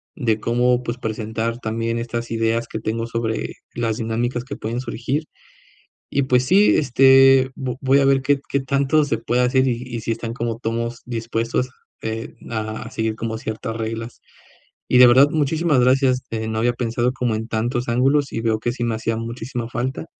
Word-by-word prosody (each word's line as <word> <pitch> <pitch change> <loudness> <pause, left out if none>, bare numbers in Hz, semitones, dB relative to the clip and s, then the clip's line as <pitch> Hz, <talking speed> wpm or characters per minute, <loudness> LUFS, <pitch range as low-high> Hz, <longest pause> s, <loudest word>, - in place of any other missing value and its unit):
de 115 -6 0
cómo, 125 +2 +1
pues, 120 +1 -4
presentar 110 +1 -3
también 115 0 -2
estas 115 0 -4
ideas 115 +1 0
que 110 - -4
tengo 115 +1 -2
sobre 115 -1 -3 0.2
las 115 -2 -1
dinámicas 120 +2 -2
que 140 - -6
pueden 115 +3 -4
surgir, 130 +4 -3 0.8
y 140 - +1
pues 125 -1 +2
sí, 200 +6 +5
este, 135 -1 +5
vo 130 -3 -4
voy 135 +1 +4
a 140 - +3
ver 135 -1 +4
qué 140 0 +2
qué 140 - +1
tanto 140 +3 +2
se 125 -5 -1
puede 120 +2 0
hacer, 130 +1 +3
y 125 -1 -1
y 115 - -4
si 115 - -2
están 115 0 -4
como 115 -1 -3
tomos 115 0 -3
dispuestos, 115 +1 -2 0.3
eh, 110 0 -5
a 110 -1 -4
a - - -10
seguir 110 0 -2
como 110 0 -4
ciertas 110 +1 -5
reglas 115 +1 -5 0.7
y - - +4
de 125 - +10
verdad, 130 +4 +7
muchísimas 155 -1 +1
gracias. 130 0 +3
Eh, 110 -1 -3
no 110 0 -2
había 120 +1 +2
pensado 120 +1 -1
como 120 -4 -1
en 110 +1 -4
tantos 120 +3 -1
ángulos 135 +4 +2
y 115 - -2
veo 110 -1 +1
que 120 +1 -1
sí 120 -1 -3
me 115 -1 0
hacía 115 0 -2
muchísima 115 +1 -5
falta, 130 +6 -3
120 Hz, 190 wpm, -21 LUFS, 115-130 Hz, 0.8 s, de